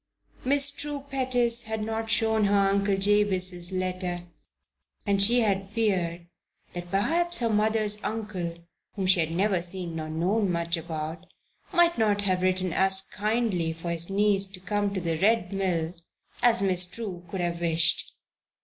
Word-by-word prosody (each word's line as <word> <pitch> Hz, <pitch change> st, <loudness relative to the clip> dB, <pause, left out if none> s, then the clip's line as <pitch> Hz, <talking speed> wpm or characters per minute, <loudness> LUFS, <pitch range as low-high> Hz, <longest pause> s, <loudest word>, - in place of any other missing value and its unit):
Miss 280 Hz, +2 st, +5 dB
True 290 Hz, -1 st, -6 dB
Pettis 245 Hz, -3 st, 0 dB
had 220 Hz, -1 st, -4 dB
not 225 Hz, +1 st, -4 dB
shown 220 Hz, -1 st, +1 dB
her 200 Hz, 0 st, +2 dB
Uncle 200 Hz, 0 st, +1 dB
Jabez's 190 Hz, -3 st, +3 dB
letter 185 Hz, -1 st, -4 dB, 0.8 s
and 200 Hz, -1 st, +1 dB
she 240 Hz, +5 st, +4 dB
had 195 Hz, -3 st, -1 dB
feared 185 Hz, -6 st, -2 dB, 0.5 s
that 175 Hz, 0 st, -8 dB
perhaps 340 Hz, -, 0 dB
her 230 Hz, -2 st, -1 dB
mother's 210 Hz, 0 st, +2 dB
uncle 205 Hz, -6 st, -5 dB, 0.4 s
(whom 195 Hz, -3 st, -3 dB
she 185 Hz, -1 st, +4 dB
had 160 Hz, -1 st, 0 dB
never 185 Hz, +2 st, 0 dB
seen 175 Hz, -1 st, -1 dB
nor 155 Hz, -1 st, -6 dB
known 185 Hz, +5 st, -1 dB
much 170 Hz, 0 st, -1 dB
about) 160 Hz, +1 st, -7 dB, 0.4 s
might 345 Hz, -4 st, +2 dB
not 205 Hz, -2 st, +1 dB
have 185 Hz, -2 st, -1 dB
written 185 Hz, -1 st, -1 dB
as 190 Hz, +1 st, +5 dB
kindly 210 Hz, -6 st, -1 dB
for 165 Hz, +1 st, -6 dB
his 170 Hz, +1 st, 0 dB
niece 200 Hz, 0 st, +3 dB
to 190 Hz, -1 st, -10 dB
come 205 Hz, +1 st, -2 dB
to 195 Hz, -, -3 dB
the 165 Hz, -2 st, -3 dB
Red 200 Hz, -1 st, +1 dB
Mill 175 Hz, -4 st, -2 dB, 0.5 s
as 235 Hz, -3 st, +3 dB
Miss 180 Hz, -2 st, +5 dB
True 190 Hz, -5 st, -7 dB
could 185 Hz, +1 st, -4 dB
have 170 Hz, 0 st, -3 dB
wished. 165 Hz, -1 st, 0 dB
195 Hz, 160 wpm, -26 LUFS, 175-220 Hz, 0.8 s, Miss